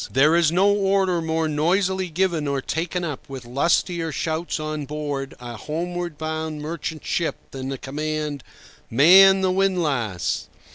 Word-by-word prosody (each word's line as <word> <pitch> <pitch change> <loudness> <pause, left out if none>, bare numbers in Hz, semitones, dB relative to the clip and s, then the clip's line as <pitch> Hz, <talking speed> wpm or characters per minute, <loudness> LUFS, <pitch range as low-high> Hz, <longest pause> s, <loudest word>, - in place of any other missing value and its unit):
There 150 +5 +4
is 170 -2 +4
no 185 +4 +3
order 195 -3 +1
more 160 0 0
noisily 180 +5 +1
given 170 -3 0
or 140 -1 0
taken 170 +6 -3
up 150 -6 -5
with 130 -2 -7
lustier 165 +6 0
shouts 160 +3 -2
on 155 -1 -4
board 145 -2 -4
a 120 -1 -7
homeward 170 +4 -4
bound 155 0 -4
merchant 155 0 -5
ship 170 - -1 0.2
than 135 0 -5
the 135 - -3
command, 150 +1 -4 0.5
"Man 190 +9 +7
the 185 -1 +2
windlass!" 155 - 0
160 Hz, 145 wpm, -23 LUFS, 145-175 Hz, 0.5 s, Man